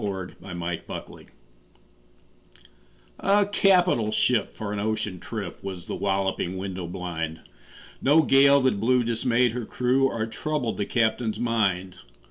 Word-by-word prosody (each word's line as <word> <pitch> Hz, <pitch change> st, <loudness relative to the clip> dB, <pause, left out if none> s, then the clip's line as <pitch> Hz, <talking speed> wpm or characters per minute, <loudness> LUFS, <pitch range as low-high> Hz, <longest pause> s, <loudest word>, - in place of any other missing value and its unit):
Y -, -, 0 dB
Z 95 Hz, -2 st, -5 dB
A 90 Hz, -2 st, -8 dB
Nautical 85 Hz, 0 st, -4 dB
Ballad -, -, -14 dB, 1.9 s
A 200 Hz, +1 st, +3 dB
CAPITAL 180 Hz, -, +3 dB
ship 120 Hz, 0 st, +1 dB
for 105 Hz, -1 st, -4 dB
an 105 Hz, -, -3 dB
ocean 110 Hz, -3 st, -2 dB
trip 100 Hz, -4 st, -6 dB
Was 95 Hz, -3 st, -6 dB
The -, -, -5 dB
Walloping 95 Hz, -2 st, -1 dB
Window 95 Hz, -2 st, -5 dB
blind 85 Hz, -3 st, -5 dB, 0.6 s
No 150 Hz, +4 st, +5 dB
gale 140 Hz, 0 st, +6 dB
that 130 Hz, -6 st, +1 dB
blew 125 Hz, +3 st, +3 dB
dismayed 120 Hz, +1 st, +1 dB
her 120 Hz, +1 st, -4 dB
crew 130 Hz, +2 st, +2 dB
Or 115 Hz, -4 st, -2 dB
troubled 130 Hz, +1 st, -3 dB
the 100 Hz, -, -2 dB
captain's 110 Hz, -2 st, 0 dB
mind. 95 Hz, -6 st, 0 dB
110 Hz, 140 wpm, -25 LUFS, 95-125 Hz, 1.9 s, gale